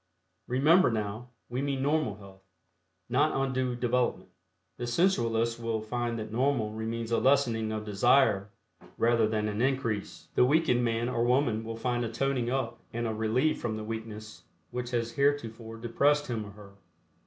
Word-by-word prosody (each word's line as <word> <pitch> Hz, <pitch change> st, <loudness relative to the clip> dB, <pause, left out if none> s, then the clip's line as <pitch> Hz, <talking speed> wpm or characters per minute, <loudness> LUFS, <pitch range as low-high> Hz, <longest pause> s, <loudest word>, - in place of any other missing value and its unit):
Remember, 150 Hz, +8 st, +4 dB
now, 110 Hz, +2 st, -3 dB, 0.2 s
we 125 Hz, +2 st, -3 dB
mean 140 Hz, -1 st, -1 dB
normal 145 Hz, -7 st, +1 dB
health, 95 Hz, -1 st, -14 dB, 0.7 s
not 145 Hz, +6 st, +2 dB
undue 130 Hz, -2 st, 0 dB
development. 125 Hz, 0 st, 0 dB, 0.5 s
The 120 Hz, -, -4 dB
sensualist 120 Hz, -6 st, +1 dB
will 115 Hz, -1 st, -1 dB
find 120 Hz, +2 st, -3 dB
that 110 Hz, -1 st, -6 dB
normal 120 Hz, -3 st, +1 dB
means 115 Hz, +1 st, -4 dB
a 115 Hz, -, +3 dB
lessening 120 Hz, -5 st, +2 dB
of 110 Hz, 0 st, -4 dB
desire 105 Hz, -1 st, +3 dB, 0.5 s
rather 115 Hz, -1 st, +3 dB
than 110 Hz, -1 st, -1 dB
an 105 Hz, +1 st, -2 dB
increase; 125 Hz, -6 st, -1 dB
the -, -, +4 dB
weakened 130 Hz, -3 st, +3 dB
man 115 Hz, 0 st, 0 dB
or 120 Hz, -2 st, 0 dB
woman 120 Hz, -3 st, +2 dB
will 115 Hz, 0 st, -5 dB
find 120 Hz, +1 st, -1 dB
a 115 Hz, -, -3 dB
toning 130 Hz, -1 st, 0 dB
up 130 Hz, -2 st, -2 dB
and 120 Hz, +1 st, -3 dB
a 110 Hz, -, -1 dB
relief 110 Hz, +8 st, +1 dB
from 110 Hz, -2 st, -2 dB
the 110 Hz, -, -5 dB
weakness 110 Hz, -1 st, -7 dB, 0.3 s
which 120 Hz, 0 st, -4 dB
has 120 Hz, -1 st, -1 dB
heretofore 115 Hz, -5 st, -1 dB
depressed 140 Hz, +6 st, +2 dB
him 110 Hz, -4 st, -3 dB
or -, -, -10 dB
her. 100 Hz, -1 st, -13 dB
120 Hz, 165 wpm, -29 LUFS, 110-130 Hz, 0.7 s, Remember